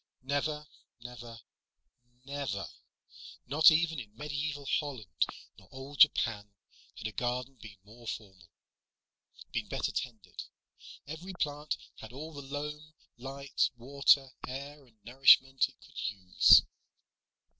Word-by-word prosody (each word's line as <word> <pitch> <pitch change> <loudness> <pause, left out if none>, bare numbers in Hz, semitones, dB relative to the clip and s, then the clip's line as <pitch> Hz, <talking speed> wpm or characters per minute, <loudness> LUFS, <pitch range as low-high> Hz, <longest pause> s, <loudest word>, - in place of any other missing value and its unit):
Never, 150 +2 -1 0.4
never, 120 -2 -10 0.8
never 140 -8 -4 0.8
not 155 +5 +7
even 160 -1 +2
in 110 -3 -10
medieval 145 0 -3
Holland 110 - -2 0.3
nor - - -21
old 135 +1 -9
Japan 110 -8 +4 0.5
had 110 - -8
a - - -5
garden 125 +3 -3
been 105 -2 -11
more 115 +3 -15
formal, 95 -6 -7 1.0
been - - -2
better - - -1
tended. 110 -7 -6 0.6
Every 165 +6 -7
plant 150 -3 -2 0.2
had 110 - -10
all 155 +4 -8
the 145 - -7
loam, 150 +2 -6 0.2
light, 135 +2 -1
water, 135 +2 +3 0.2
air 140 +2 -8
and 115 -2 -27
nourishment 135 +1 +5
it - - -20
could - - -12
use. 95 -2 +6
135 Hz, 115 wpm, -31 LUFS, 115-145 Hz, 1.0 s, not